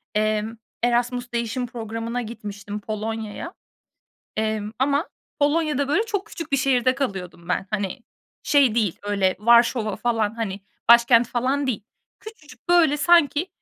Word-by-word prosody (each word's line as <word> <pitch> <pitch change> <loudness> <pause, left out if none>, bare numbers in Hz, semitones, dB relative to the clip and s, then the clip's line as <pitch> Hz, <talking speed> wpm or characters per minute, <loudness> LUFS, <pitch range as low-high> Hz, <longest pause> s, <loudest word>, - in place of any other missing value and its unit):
emm, 215 +1 0 0.3
Erasmus 245 0 0
Değişim 235 +2 -2
Programı'na 230 0 -4
gitmiştim 210 -2 -7
Polonya'ya. 220 - -5 0.8
Emm, 215 -1 -1
ama 280 +5 +1 0.3
Polonya'da, 295 -1 +1
böyle, 395 +10 +2
çok 410 -3 -3
küçük 325 -3 -8
bir 275 - +3
şehirde 255 -1 +2
kalıyordum 185 -9 -5
ben. 190 - -1
Hani, 205 +3 -2 0.4
şey 275 -6 +3
değil, 210 -7 0
öyle 200 -2 +1
Varşova 235 -1 +4
falan, 225 -1 -1
hani, 205 -4 -3 0.3
başkent 235 0 +6
falan 265 +3 0
değil. 215 -5 -2 0.4
Küçücük, 310 - -14
böyle, 330 -4 +5
sanki 315 +1 +4
235 Hz, 130 wpm, -23 LUFS, 215-275 Hz, 0.8 s, başkent